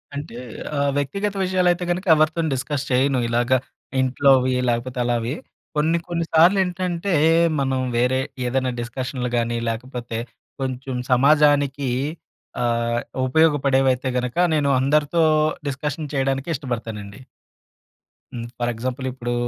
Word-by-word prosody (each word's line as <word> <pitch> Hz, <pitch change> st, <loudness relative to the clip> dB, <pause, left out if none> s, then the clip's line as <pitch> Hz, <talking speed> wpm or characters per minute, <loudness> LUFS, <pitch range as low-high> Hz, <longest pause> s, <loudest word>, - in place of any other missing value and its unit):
అంటే 140 Hz, -4 st, -6 dB, 0.4 s
ఆహ్, 140 Hz, 0 st, +2 dB
వ్యక్తిగత 200 Hz, +9 st, -1 dB
విషయాలైతే 180 Hz, -1 st, +2 dB
గనక 180 Hz, +3 st, -2 dB
ఎవరితోని 155 Hz, +1 st, +1 dB
డిస్కస్ 140 Hz, +2 st, -3 dB
చెయను 130 Hz, +1 st, +2 dB
ఇలాగ. 120 Hz, +2 st, 0 dB, 0.5 s
ఇంట్లోవి 130 Hz, 0 st, +3 dB, 0.2 s
లేకపోతే 120 Hz, +2 st, -2 dB
అలావి. 120 Hz, +1 st, 0 dB, 0.4 s
కొన్ని 160 Hz, +3 st, +2 dB
కొన్ని 170 Hz, -1 st, -2 dB
సార్లు 170 Hz, +5 st, +6 dB
ఏంటంటే 180 Hz, +1 st, -2 dB, 0.5 s
మనం 135 Hz, -1 st, 0 dB, 0.2 s
వేరే 125 Hz, +2 st, +2 dB, 0.3 s
ఏదన్నా 130 Hz, 0 st, 0 dB
డిస్కషన్లు 125 Hz, +1 st, -4 dB
గానీ 120 Hz, 0 st, 0 dB
లేకపోతే 120 Hz, 0 st, -5 dB, 0.4 s
కొంచెం 130 Hz, 0 st, -3 dB, 0.2 s
సమాజానికీ 145 Hz, 0 st, +3 dB, 0.7 s
ఆహ్, 120 Hz, 0 st, 0 dB, 0.3 s
ఉపయోగపడేవైతే 135 Hz, -3 st, +2 dB
గనక 125 Hz, +4 st, -3 dB, 0.2 s
నేను 145 Hz, -2 st, +1 dB
అందరితో 150 Hz, +4 st, +2 dB, 0.4 s
డిస్కషన్ 145 Hz, +2 st, -3 dB
చేయడానికి 135 Hz, +2 st, -1 dB
ఇష్టపడతానండి. 115 Hz, -5 st, -6 dB, 1.1 s
హ్మ్. 115 Hz, -1 st, -5 dB
ఫర్ 120 Hz, -, 0 dB
ఎగ్జాంపుల్ 130 Hz, +3 st, -4 dB
ఇప్పుడూ 120 Hz, -1 st, -4 dB
135 Hz, 110 wpm, -22 LUFS, 125-150 Hz, 1.1 s, సార్లు